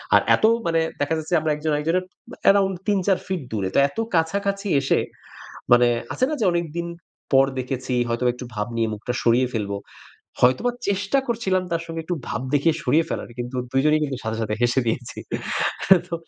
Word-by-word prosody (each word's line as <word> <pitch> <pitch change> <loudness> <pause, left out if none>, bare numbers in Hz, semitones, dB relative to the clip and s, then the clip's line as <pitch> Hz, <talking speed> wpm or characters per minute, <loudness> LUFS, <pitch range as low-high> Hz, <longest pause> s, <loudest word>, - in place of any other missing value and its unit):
আর - - +7
এত - - -8 0.2
মানে 165 -1 +2 0.2
দেখা 145 +3 +1
যাচ্ছে 160 +2 -4
আমরা 155 0 0
একজন 155 +1 -2
আরেকজনের 165 +5 0 0.2
ব্যা - - -11
অ্যারাউন্ড 195 -1 +4
৩-৪ 195 -2 +2
ফিট 190 -3 -2
দূরে। 100 -4 -1
তো - - +6
এত - - -19 0.2
কাছাকাছি 200 +5 0
এসে, 135 - +2 0.7
মানে 120 0 +7 0.3
আছে 255 - +2
না - - -1
যে - - +3
অনেকদিন 170 0 -2 0.5
পর 135 0 +7
দেখেছি, 130 0 -3 0.2
হয়তোবা 120 +1 +1
একটু 125 - -8
ভাব 105 0 -2
নিয়ে 115 -1 +1
মুখটা 110 +4 -4
সরিয়ে 120 +2 +4
ফেলব। 105 -3 -2 0.7
হয়তোবা 130 - +4 0.2
চেষ্টা 200 +6 +1
করছিলাম 195 -6 0
তার 165 0 0
সঙ্গে 165 0 -5
একটু 175 - -2
ভাব 115 - -3
দেখিয়ে 150 +3 +3
সরিয়ে 155 +6 +3
ফেলার। - - -4
কিন্তু 125 +1 -4 0.2
২ 135 - +3
জনেই 155 0 +4
কিন্তু 135 -3 -3
সাথে, 110 0 -2
সাথে 105 -1 -1
হেসে 120 +2 +3
দিয়েছি। 115 +1 -3 0.9
তো 170 - -3
150 Hz, 185 wpm, -23 LUFS, 125-180 Hz, 0.9 s, আর